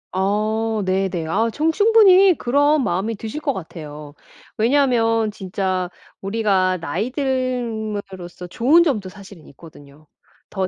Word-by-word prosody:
아 215 +3 -1
네네. 185 -3 -1
아 220 +8 0
저는 310 +7 0
충분히 395 -1 +5
그런 285 +3 +2
마음이 200 +3 -2
드실 220 +7 -6
것 290 -2 -1
같아요. 150 - -9 0.4
왜냐면 230 -3 +2
진짜 185 -2 -3 0.3
우리가 195 -3 0
나이 180 - -3
듦으로써 220 - -4
좋은 280 - +4
점도 230 - -1
사실은 195 -3 -13
있거든요. 145 0 -16 0.4
더 190 -2 -2
215 Hz, 260 characters per minute, -20 LUFS, 185-255 Hz, 0.4 s, 충분히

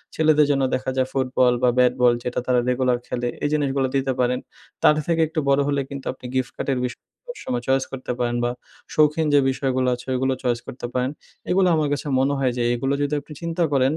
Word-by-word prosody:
ছেলেদের 155 -1 +4
জন্য 135 -1 +1
দেখা 130 0 -3
যায় 130 0 +2
ফুটবল 130 -2 +2
বা, 125 - +6
ব্যাট 125 -1 +5
বল, 120 -1 +6
যেটা 125 - -2
তারা 125 -1 +3
রেগুলার 125 -1 +2
খেলে। 120 0 -2 0.2
এই 145 - +2
জিনিসগুলো 140 -3 +1
দিতে 135 0 +1
পারেন। 125 0 +1 0.4
তাদের 150 0 +5
থেকে 165 -1 +2
একটু 160 +1 -2
বড়ো 140 +1 +4
হলে 140 -1 +1
কিন্তু 140 -1 -7
আপনি 130 - -15
গিফট 130 -1 -1
কার্ডের 135 -2 -1
বিষয় 125 - -6 0.3
সবসময় 125 - -4
চয়েস 135 0 +3
করতে 130 -2 -5
পারেন 120 0 0
বা, 120 - +1 0.4
শৌখিন 155 +1 +3
যে 145 - +7
বিষয়গুলো 130 -1 0
আছে, 125 - -12
ওইগুলো 130 +1 +1
চয়েস 120 -2 +1
করতে 120 - -7
পারেন। 130 +2 0 0.4
এগুলো 185 +1 +4
আমার 155 -2 +1
কাছে 145 +1 -4
মনে 140 +2 +2
হয় 130 -2 +2
যে, 120 - 0
এগুলো 135 +3 -1
যদি 145 +1 0
আপনি 150 - -12
চিন্তা 170 +1 -1
করেন 135 +1 +3
130 Hz, 215 wpm, -23 LUFS, 125-145 Hz, 0.4 s, যে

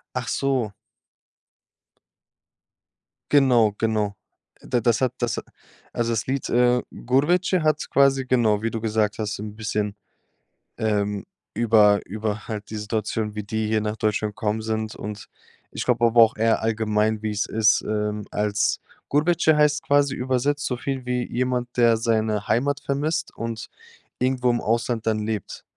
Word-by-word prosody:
Ach 125 0 -3
so. 130 -6 0 2.6
Genau 125 -7 +4
genau. 105 -2 0 0.5
Da 120 - 0
das 120 +1 +1
hat 130 -2 +1
das 120 -3 -1 0.5
also 120 0 -1
das 115 -1 -1
Lied, 135 0 -2
äh, 125 0 +3
„Gurbetçi“ 170 +8 +1
hat 155 -1 +1
quasi, 135 -1 +3
genau, 115 -5 +2
wie 115 - -1
du 115 - -3
gesagt 110 -1 0
hast, 105 -2 -3
'n 105 0 -7
bisschen, 105 -2 -2 0.8
ähm, 105 -2 -1 0.3
über 105 -3 +4
über 110 +2 -4
halt 105 -2 -6
die 110 - -4
Situation, 105 0 -2
wie 105 - -4
die 110 +1 -2
hier 110 -1 +1
nach 105 0 -2
Deutschland 105 -1 -1
gekommen 110 +1 -1
sind, 110 0 -3
und 105 -2 -7 0.4
ich - - -4
glaube 120 -1 +2
aber 115 0 +5
auch 110 - +1
eher 115 +1 +2
allgemein, 110 -1 0
wie 110 -1 -2
es 105 -1 -1
ist, 110 -1 +3
ähm, 105 -1 -2
als 105 0 0 0.3
„Gurbetçi“ 160 +1 +3
heißt 150 0 +3
quasi 140 -1 +2
übersetzt 130 +3 0
soviel 130 +1 -3
wie, 125 -1 -2
jemand, 125 0 -1
der 115 -1 +5
seine 110 -2 0
Heimat 140 +4 +1
vermisst 150 +4 -1
und 115 -1 -5 0.5
irgendwo 125 -1 +1
im 120 0 +1
Ausland 115 0 -1
dann 110 -1 +1
lebt. 110 -3 -4
115 Hz, 150 wpm, -23 LUFS, 105-125 Hz, 2.6 s, aber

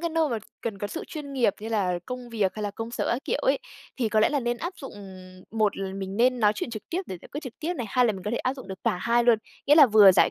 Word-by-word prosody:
cái 335 0 -1
nơi 320 -1 +2
mà 235 - -1 0.2
cần 215 -4 -4
có 205 - -2
sự 325 - -6
chuyên 295 -3 -7
nghiệp 245 -7 +2
như 220 - -5
là 190 -6 0
công 250 -1 -6
việc 210 -5 0
hay 215 - -5
là 205 - -1
công 225 +3 -6
sở 240 - -2
các 245 +4 -3
kiểu - - 0
ấy, - - +3 0.4
thì 240 -4 0
có 215 0 +2
lẽ - - +5
là 290 -2 0
nên 240 0 -1
áp 345 +8 -4
dụng 270 - -8 0.6
một 215 -2 +1
là 195 -1 -4
mình 195 0 -5
nên 250 +2 +3
nói 210 -1 +5
chuyện 225 - -4
trực 215 -3 -6
tiếp 360 +3 -1
để 185 - -5
giải - - -12
quyết 290 - -4
trực 255 - -7
tiếp 340 +3 -2
này. 245 -8 -4
Hai 250 +4 +3
là 220 - +2
mình 190 -2 -8
có 210 - -1
thể 235 - -1
áp 255 +2 -1
dụng 260 -7 -11
được 190 -1 -6
cả - - +2
hai 235 +5 +2
luôn, 235 -2 +5 0.3
nghĩa 290 - +7
là 300 -3 +9
vừa 210 -4 +8
giải - - +4
235 Hz, 320 wpm, -26 LUFS, 205-270 Hz, 0.6 s, là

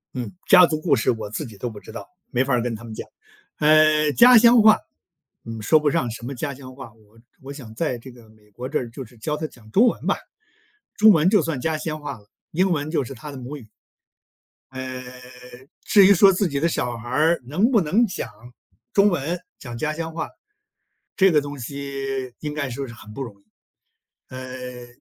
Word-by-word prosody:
嗯， 125 -3 -4 0.2
家 180 - +8
族 155 -2 -2
故 160 +1 +2
事 110 - 0
我 110 -3 -4
自 110 - -4
己 110 -5 -12
都 120 - -4
不 105 - -10
知 - - -13
道， 115 - -8 0.2
没 125 +1 +1
法 135 0 -1
儿 120 - +2
跟 120 -1 -2
他 110 - -11
们 115 -2 -8
讲， - - -7 0.5
呃， 155 0 +4
家 245 - +8
乡 235 +1 +7
话， 215 0 +7 0.7
嗯， 115 -1 -7
说 155 +8 +4
不 150 -1 +1
上 140 -5 0
什 115 - -9
么 135 +2 -5
家 140 +3 -4
乡 130 -1 -12
话， 130 -4 -11
我 110 0 -25 0.2
我 135 +1 -9
想 130 -6 -10
在 130 0 -2
这 130 +3 -12
个 120 -3 -17
美 105 -1 -24
国 125 +5 -7
这 - - 0
儿 120 - -4
就 135 - -7
是 120 +1 -19
教 150 +7 -3
他 155 +1 -4
讲 110 -6 -18
中 225 - +5
文 - - -2
吧， - - +2 0.8
中 215 +1 +7
文 165 -1 +4
就 210 -4 +5
算 155 -3 -3
家 160 +3 -1
乡 155 -1 -4
话 145 -3 -6
了， 105 - -24 0.2
英 185 +3 +1
文 155 -2 -1
就 155 -4 +1
是 130 - -8
他 145 +5 -9
的 140 - -9
母 130 +4 -7
语。 120 -6 -14 1.0
呃， 130 -1 -6 0.8
至 200 -2 +6
于 200 - +7
说 195 +1 +6
自 190 +1 +1
己 140 -4 -2
的 165 - +2
小 125 -7 -2
孩 120 +1 -9
儿 155 +6 +2
能 185 - +1
不 230 - +5
能 195 +10 +2
讲 175 - -5 0.6
中 200 +1 +5
文、 170 0 -2 0.2
讲 120 -3 -8
家 155 +5 -2
乡 165 +1 -5
话， 165 - -4 0.9
这 190 -2 +5
个 150 - +4
东 145 0 -7
西 135 0 -5
应 150 -1 -5
该 145 -2 -3
说 135 +2 -5
是 115 - -10
很 105 -1 -13
不 135 - -7
容 110 -6 -7
易。 100 - -34 0.8
呃， 125 -1 -8
140 Hz, 240 characters per minute, -23 LUFS, 120-160 Hz, 1.0 s, 家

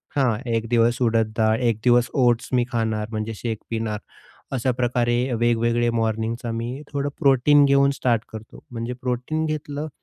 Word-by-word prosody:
हां 130 -6 +2 0.2
1 115 0 -1
दिवस 120 +1 +2
उडद 115 -2 +2
डाळ, 110 -1 +3
1 115 -3 0
दिवस 120 -1 +4 0.2
ओट्स 120 -1 +1
मी 125 -1 +3
खाणार, 110 -2 -1
म्हणजे 110 0 -3
शेक 110 +1 -3
पिणार 110 -2 -2 0.6
अशाप्रकारे 120 -1 0 0.2
वेग-वेगळे 120 0 +1
मॉर्निंगचा 115 +1 -2
मी 120 +5 -4
थोडं 140 0 -1
प्रोटीन 140 +2 +5
घेऊन 140 0 +4
स्टार्ट 120 -5 0
करतो. 110 0 -11
म्हणजे 115 0 -4
प्रोटीन 125 +6 -2
घेतलं 150 0 -4
120 Hz, 150 wpm, -23 LUFS, 115-130 Hz, 0.6 s, प्रोटीन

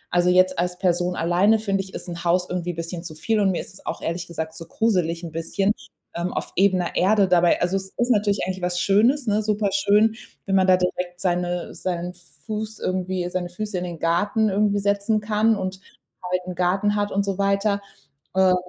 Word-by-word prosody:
also, 175 0 +4
jetzt 185 0 +4
als 180 0 -1
Person 180 -1 +1
alleine 180 +7 +3
finde 195 -3 -1
ich, 190 0 -11
ist - - -6
'n 170 0 -6
Haus 180 +1 +2
irgendwie 175 -1 -3
bisschen 165 +1 -5
zu 160 -3 -8
viel. 220 +7 0
Und 200 -2 +3
mir 180 - 0
ist - - -11
es - - -13
auch - - -3
ehrlich 170 +1 -3
gesagt 160 -1 -5
zu 165 - -9
gruselig 180 -6 0
'n 165 - -6
bisschen, 195 +5 0 0.4
ähm, 170 +1 -2
auf - - -4
ebener 185 -2 +2
Erde 200 +1 +4
dabei. 175 -1 +4
Also, 180 +2 +1
es 190 0 -6
ist 245 +1 +1
natürlich 205 -2 +2
eigentlich 185 0 -4
was 180 0 -1
Schönes, 235 +8 +3
ne, 215 -1 +1
super 210 -1 0
schön, 220 -5 +3 0.3
wenn 195 - -2
man 190 0 +4
da 185 - +6
direkt 180 -1 -2
seine 175 -1 -1
seinen 180 -1 -3 0.3
Fuß 215 0 -4
irgendwie 185 -1 -2
seine 180 -1 -2
Füße 210 +3 -5
in - - -4
den 170 -2 -6
Garten 205 +7 +1
irgendwie 205 +1 +2
setzen 200 +2 +1
kann 215 +1 +2
und 190 0 -4 0.5
halt 185 0 +1
'n 180 - -5
Garten 190 +4 +1
hat 205 0 0
und 200 +1 0
so 195 -1 -3
weiter. 200 +1 +1 0.5
Äh, 190 -1 +5
185 Hz, 210 wpm, -23 LUFS, 175-205 Hz, 0.5 s, da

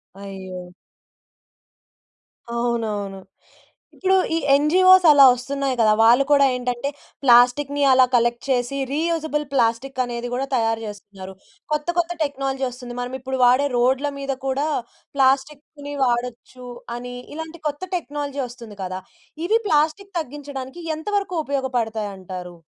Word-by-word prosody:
అయ్యో! 190 -2 -8 1.9
అవునవును. 215 -5 -2 0.8
ఇప్పుడు 380 0 +2 0.2
ఈ - - +2 0.2
ఎన్‌జీఓస్ 370 +6 +6
అలా 285 -2 +8
వస్తున్నాయి 270 +2 -2
కదా! 215 -1 +5
వాళ్ళు 240 +4 +6
కూడా 280 -1 +6
ఏంటంటే, 250 +2 -2 0.3
ప్లాస్టిక్కుని 265 +4 +4
అలా 255 0 +6
కలెక్ట్ 240 0 +1
చేసి, 250 +1 0
రీయూజబుల్ 315 -1 -1
ప్లాస్టికనేది 245 0 -1
గూడా 265 +2 -2
తయారు 225 -1 0
జేస్తున్నారు. 200 -2 -9 0.4
కొత్త, 300 +2 -2
కొత్త 345 0 +1
టెక్నాలజీ 270 -2 -2
వస్తుంది, 245 -1 -9
మనం 250 +1 -5
ఇప్పుడు 265 +1 -4
వాడే 255 +4 +4
రోడ్ల 260 +4 +2
మీద 275 -1 -3
కూడా 275 +3 0 0.5
ప్లాస్టిక్కుని 280 +2 0
వాడొచ్చు 245 0 -3 0.3
అని, 245 0 -7 0.2
ఇలాంటి 320 +1 -7
కొత్త 290 +4 -8
టెక్నాలజీ 290 -4 -4
ఒస్తుంది 235 -4 -12
కదా! 185 0 -5 0.4
ఇవి 445 +5 +3
ప్లాస్టిక్కు 320 +5 +1
తగ్గించడానికి, 285 +1 -8 0.2
ఎంతవరకు 395 +2 -2
ఉపయోగపడతాయంటారు? 215 -9 -3
260 Hz, 115 wpm, -22 LUFS, 235-290 Hz, 1.9 s, అలా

